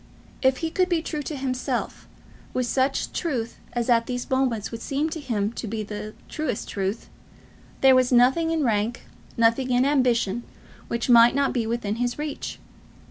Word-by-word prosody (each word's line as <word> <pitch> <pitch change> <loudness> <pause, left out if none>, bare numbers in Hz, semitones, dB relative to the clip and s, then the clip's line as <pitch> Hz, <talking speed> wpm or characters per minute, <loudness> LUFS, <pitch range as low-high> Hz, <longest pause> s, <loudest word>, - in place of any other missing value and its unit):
If 260 -1 +3
he 320 - -2
could 365 +1 +1
be 335 -3 +1
true 305 -2 -3
to 295 +1 -5
himself, 260 -2 -3 0.5
with 255 - +1
such 265 +3 0
truth 250 -9 -3
as 240 -1 -1
at 230 -2 +3
these 245 -1 -3
moments 255 -5 0
would 230 -1 -6
seem 290 +5 -1
to 320 - -4
him 225 -6 -1
to 235 - -5
be 215 +1 -3
the 210 +1 -7
truest 305 -8 -3
truth, 195 +2 -3 0.7
there 265 -1 +7
was 255 0 +3
nothing 260 +7 +4
in 325 -2 +1
rank, 225 0 0 0.3
nothing 230 +3 +3
in 250 +1 +3
ambition, 240 -6 +2 0.5
which 235 0 -2
might 235 0 +7
not 280 0 +2
be 235 -4 -1
within 225 -2 -2
his 245 0 -1
reach. 295 -1 -5
245 Hz, 175 wpm, -25 LUFS, 230-275 Hz, 0.7 s, there